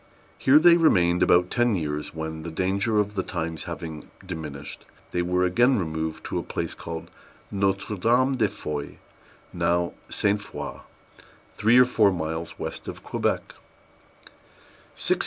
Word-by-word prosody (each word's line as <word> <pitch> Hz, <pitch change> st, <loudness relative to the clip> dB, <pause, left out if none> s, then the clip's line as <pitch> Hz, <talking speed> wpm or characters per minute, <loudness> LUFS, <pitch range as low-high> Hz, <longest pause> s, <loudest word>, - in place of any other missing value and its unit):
Here 135 Hz, +3 st, +6 dB
they 170 Hz, +2 st, +7 dB
remained 90 Hz, -, +4 dB
about 90 Hz, +1 st, +4 dB
ten 120 Hz, -2 st, +2 dB
years, 75 Hz, -3 st, -3 dB
when, 80 Hz, 0 st, -5 dB
the 85 Hz, -, -6 dB
danger 95 Hz, +6 st, 0 dB
of 105 Hz, 0 st, +1 dB
the 95 Hz, -, 0 dB
times 80 Hz, -4 st, -4 dB
having 80 Hz, -2 st, -7 dB, 0.2 s
diminished, 75 Hz, -6 st, -7 dB, 0.3 s
they 90 Hz, -, 0 dB
were 90 Hz, +1 st, +1 dB
again 120 Hz, +9 st, +4 dB
removed 80 Hz, -3 st, -3 dB
to -, -, -2 dB
a -, -, -4 dB
place -, -, -4 dB
called 80 Hz, -1 st, -7 dB, 0.4 s
Notre 100 Hz, +1 st, 0 dB
Dame 125 Hz, +7 st, +3 dB
de 115 Hz, -4 st, +2 dB
Foy, 75 Hz, -6 st, -5 dB, 0.6 s
now 85 Hz, 0 st, +1 dB, 0.2 s
St. 105 Hz, 0 st, +1 dB
Foi, 100 Hz, -, -7 dB, 0.7 s
three 110 Hz, +3 st, +4 dB
or 125 Hz, -, +8 dB
four 110 Hz, -5 st, +4 dB
miles 80 Hz, -1 st, -4 dB
west -, -, -6 dB
of -, -, -7 dB
Quebec. -, -, -1 dB
90 Hz, 140 wpm, -25 LUFS, 80-105 Hz, 0.7 s, or